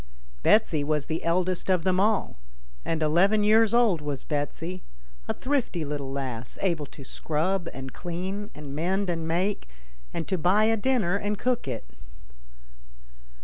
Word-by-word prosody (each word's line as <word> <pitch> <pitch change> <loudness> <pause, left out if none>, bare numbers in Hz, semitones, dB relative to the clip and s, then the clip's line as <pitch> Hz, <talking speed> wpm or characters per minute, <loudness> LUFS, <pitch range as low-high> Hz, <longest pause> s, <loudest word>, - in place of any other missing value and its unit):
Betsy 165 - +4
was 150 -1 0
the 160 +1 -3
eldest 180 +2 +1
of 180 -3 +3
them 185 0 +2
all, 210 +1 +2 0.5
and 165 -1 -1
eleven 195 +8 +4
years 220 +1 +5
old 230 -9 +4
was 145 -3 -4
Betsy, 165 +4 -3 0.5
a - - 0
thrifty 255 - -1
little 140 -2 -4
lass, 130 -4 -4
able 165 -6 0
to 140 - -12
scrub 170 +6 -1
and 135 0 -7
clean, 190 +4 -4
and 145 -2 -7
mend 185 +4 0
and 165 -1 -3
make, 180 - -1 0.4
and 165 -2 -4
to 190 -2 0
buy 185 +6 +4
a 225 +1 +4
dinner 215 -5 +1
and 205 +1 -2
cook 245 - 0
it. 120 - -4
175 Hz, 150 wpm, -27 LUFS, 150-205 Hz, 0.5 s, years